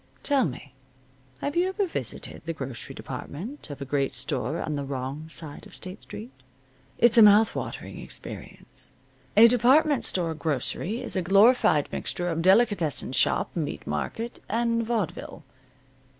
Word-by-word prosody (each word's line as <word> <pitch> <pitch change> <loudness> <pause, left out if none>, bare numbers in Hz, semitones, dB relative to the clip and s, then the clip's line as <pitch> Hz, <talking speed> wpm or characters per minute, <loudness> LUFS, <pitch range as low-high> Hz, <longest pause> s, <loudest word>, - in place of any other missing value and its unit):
Tell 280 -3 +2
me, 140 -2 -7 0.7
have 285 - -2
you 355 +2 +2
ever 400 +1 0
visited 350 - -4
the 165 - -2
grocery 135 -6 -6
department 210 - -7
of 145 -1 -8
a - - -7
great 135 -1 -1
store 145 +5 -2
on 155 - -2
the 140 - -3
wrong 140 +3 -5
side 155 -3 -8
of - - -14
State 185 +2 -8
Street? 110 +5 -9 0.7
It's 235 0 +5
a - - +9
mouth 210 +1 +7
watering - - -6
experience. - - -7 0.4
A 225 +2 +10
department 260 +5 +4
store 170 -3 +1
grocery 160 - -2
is - - +1
a 185 - +1
glorified 195 - +4
mixture 175 0 -2
of 165 -1 -1
delicatessen 190 - +2
shop, - - +2
meat 155 -4 -3
market, 230 +1 -4
and 230 +1 +1
vaudeville. 215 -9 -3
180 Hz, 150 wpm, -26 LUFS, 145-235 Hz, 0.7 s, A